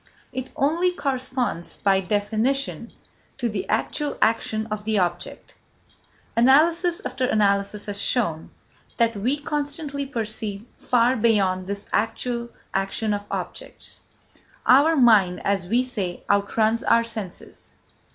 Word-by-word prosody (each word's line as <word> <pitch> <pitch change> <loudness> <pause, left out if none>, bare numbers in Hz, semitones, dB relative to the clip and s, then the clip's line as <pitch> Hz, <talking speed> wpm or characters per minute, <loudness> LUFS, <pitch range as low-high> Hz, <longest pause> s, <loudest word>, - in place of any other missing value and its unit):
It 260 +1 -4
only 330 +6 +2
corresponds, 260 - -2
by 195 -1 +2
definition, 220 +8 -1 0.5
to 245 -3 -1
the 210 -4 -4
actual 290 +7 -1
action 220 -1 +1
of 210 -1 -3
the 220 0 0
object. 175 -2 -2 0.8
Analysis 330 +8 +4
after 255 - -1
analysis 200 -1 +1
has 205 -1 -3
shown 170 -12 0 0.5
that 230 -1 +2
we 245 +8 0
constantly 290 -1 -3
perceive 220 -4 -4
far 245 +1 +3
beyond 195 -5 +2
this 200 +1 -4
actual 235 +2 -1 0.2
action 195 +3 -1
of 205 0 -4
objects. - - -6 0.6
Our 290 +6 +6
mind, 215 - +5
as 195 -3 0
we 240 +6 +2
say, 200 -8 -4
outruns 215 +3 +2
our 230 0 +4
senses. 220 -5 -9
225 Hz, 120 wpm, -24 LUFS, 200-260 Hz, 0.8 s, Our